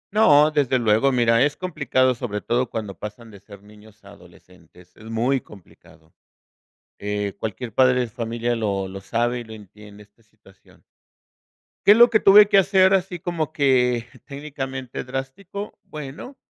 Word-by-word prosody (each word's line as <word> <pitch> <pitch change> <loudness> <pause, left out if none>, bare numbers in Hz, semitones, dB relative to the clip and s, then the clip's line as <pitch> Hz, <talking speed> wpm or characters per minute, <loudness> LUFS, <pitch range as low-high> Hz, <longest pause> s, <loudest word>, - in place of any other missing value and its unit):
No, 155 -8 +5
desde 140 -4 +1
luego, 115 +3 +2
mira, 115 -1 +3
es 145 - -2
complicado, 135 -7 0
sobre 110 -4 -5
todo 120 +3 -1
cuando 105 -5 -6
pasan 110 +2 -9
de 100 - -14
ser 100 0 -15
niños 105 +1 -19
a 100 - -15
adolescentes, 90 -2 -19
es 110 - -15
muy 115 +4 0
complicado. 85 -6 -19 0.9
Eh, 105 -1 -4
cualquier 110 +2 -6
padre 130 -1 +3
de 125 - -1
familia 115 +1 -3
lo 100 -4 -2
lo 95 +1 -8
sabe 120 +3 -1
y - - -9
lo 110 - -13
entiende, 105 0 -14
esta 105 +3 -26
situación. 105 -3 -24 1.0
¿Qué 205 - +8
es - - +1
lo 240 0 +7
que 220 - +4
tuve 205 +1 +7
que 200 -1 +5
hacer, 190 0 +3
así 190 -1 0
como 160 -3 -3
que 125 -6 +1 0.2
técnicamente 135 -3 -7
drástico? 135 +11 -7
Bueno, 150 - -10
120 Hz, 160 wpm, -22 LUFS, 105-145 Hz, 1.0 s, Qué